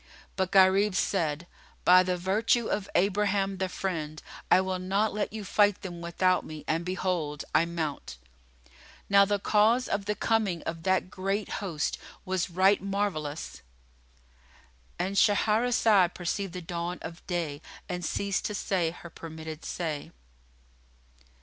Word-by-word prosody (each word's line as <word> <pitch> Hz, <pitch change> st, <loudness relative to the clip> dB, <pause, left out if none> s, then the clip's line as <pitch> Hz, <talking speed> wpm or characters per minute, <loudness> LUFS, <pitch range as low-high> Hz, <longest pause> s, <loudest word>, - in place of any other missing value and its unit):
But 190 Hz, -1 st, -1 dB
Gharib 190 Hz, +1 st, +5 dB
said 165 Hz, -5 st, 0 dB, 0.4 s
"By 180 Hz, +1 st, +8 dB
the 180 Hz, 0 st, -1 dB
virtue 215 Hz, +6 st, +1 dB
of 200 Hz, -2 st, -2 dB
Abraham 195 Hz, 0 st, +1 dB
the 190 Hz, 0 st, -1 dB
Friend, 155 Hz, -5 st, -4 dB, 0.3 s
I -, -, +6 dB
will 185 Hz, -1 st, -1 dB
not 195 Hz, +4 st, 0 dB
let 210 Hz, 0 st, -2 dB
you 215 Hz, -1 st, -6 dB
fight 205 Hz, +1 st, +2 dB
them 175 Hz, -3 st, -6 dB
without 180 Hz, +2 st, +1 dB
me 155 Hz, -1 st, -9 dB
and 165 Hz, +2 st, 0 dB
behold, 175 Hz, -5 st, -2 dB
I 165 Hz, -, +4 dB
mount!" 155 Hz, -, -4 dB, 0.9 s
Now 200 Hz, 0 st, +7 dB
the 205 Hz, +1 st, +1 dB
cause 220 Hz, +5 st, +3 dB
of 200 Hz, 0 st, -2 dB
the 210 Hz, 0 st, -1 dB
coming 205 Hz, -8 st, 0 dB
of 165 Hz, 0 st, -4 dB
that 185 Hz, +1 st, +1 dB
great 195 Hz, +2 st, -2 dB
host 165 Hz, -7 st, -2 dB, 0.3 s
was 185 Hz, -2 st, -1 dB
right 190 Hz, +3 st, +3 dB
marvellous.[FN#46]——And 65 Hz, -, -6 dB
Shahrazad 210 Hz, -3 st, +3 dB
perceived 185 Hz, +1 st, -3 dB
the 180 Hz, -1 st, -6 dB
dawn 170 Hz, +1 st, -4 dB
of 165 Hz, +1 st, -8 dB
day 165 Hz, -5 st, -2 dB, 0.3 s
and 180 Hz, 0 st, -4 dB
ceased 200 Hz, +4 st, -1 dB
to 210 Hz, -, -2 dB
say 185 Hz, -4 st, 0 dB
her 170 Hz, 0 st, -11 dB
permitted 160 Hz, -1 st, -8 dB
say. 155 Hz, -5 st, -4 dB
185 Hz, 135 wpm, -28 LUFS, 165-200 Hz, 0.9 s, By